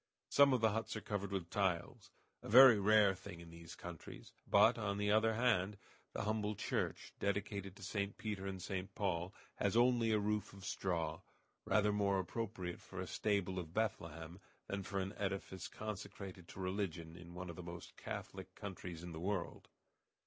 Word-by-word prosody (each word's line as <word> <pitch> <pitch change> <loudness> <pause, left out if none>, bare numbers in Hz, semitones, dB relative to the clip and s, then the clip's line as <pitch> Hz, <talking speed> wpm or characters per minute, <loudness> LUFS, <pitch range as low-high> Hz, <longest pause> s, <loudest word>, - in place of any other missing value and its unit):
Some 140 -1 +7
of 125 -3 +3
the 110 -1 +5
huts 110 +2 -2
are - - -2
covered 100 -2 -3
with 90 -4 -3
tiles 95 -4 -1 0.3
a - - -8
very 125 -1 +10
rare 105 -1 +6
thing 90 -2 -9
in 85 -1 -11
these 85 0 -10
countries; 85 -2 -9 0.2
but, - - +6
on 100 -2 -1
the 105 0 +1
other 110 +1 +4
hand, 105 -4 +2 0.4
the - - -2
humble 105 0 0
church, - - -2
dedicated 100 -1 -2
to 100 - -12
St. 100 +1 -2
Peter 100 -3 -3
and 95 -1 -4
St. 95 +2 -4
Paul, 90 -3 -1 0.3
has 100 +2 +2
only 120 -2 +4
a 110 - +4
roof 105 0 -1
of 100 -1 -10
straw, 85 -5 -1 0.4
rather 105 -1 +3
more 100 -1 +2
appropriate 95 -1 -3
for - - -8
a - - -2
stable 100 -3 0
of 80 -1 -7
Bethlehem 85 -5 -2 0.3
than 100 0 -3
for 100 0 -3
an 95 +1 -2
edifice 95 -1 -3
consecrated 100 -4 -7
to - - -10
religion 90 -4 -2
in 85 0 -11
one 90 0 -5
of - - -10
the 90 - -7
most 85 0 -8
Catholic - - -6
countries 90 -4 -6
of 90 -1 -6
the 80 - -6
world. 95 0 -2
100 Hz, 180 wpm, -38 LUFS, 90-105 Hz, 0.4 s, very